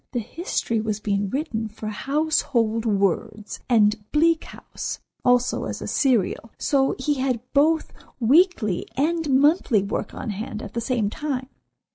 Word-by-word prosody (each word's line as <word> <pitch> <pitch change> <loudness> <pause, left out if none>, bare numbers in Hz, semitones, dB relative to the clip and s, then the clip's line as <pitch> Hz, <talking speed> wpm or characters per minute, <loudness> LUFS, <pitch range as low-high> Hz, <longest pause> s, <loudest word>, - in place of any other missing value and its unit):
The 245 - 0
history 235 - -2
was 215 -1 -2
being 200 -2 -1
written 240 -4 -2
for 215 0 -7
'Household 240 -2 0
Words,' 210 +1 -1
and 215 -2 +4
'Bleak 325 +1 +3
House' - - -6 0.3
also 245 0 +2
as - - -4
a - - -6
serial, 230 -4 +1
so 270 -2 +1
he 280 +1 -1
had 260 -3 0
both 310 +3 +2 0.3
weekly 250 - +3
and 320 +2 0
monthly 270 - +4
work 200 - -4
on 220 - -4
hand 215 +1 -5
at - - -8
the 235 - -2
same 230 -4 0
time." 270 -3 -3
245 Hz, 145 wpm, -24 LUFS, 215-290 Hz, 0.3 s, and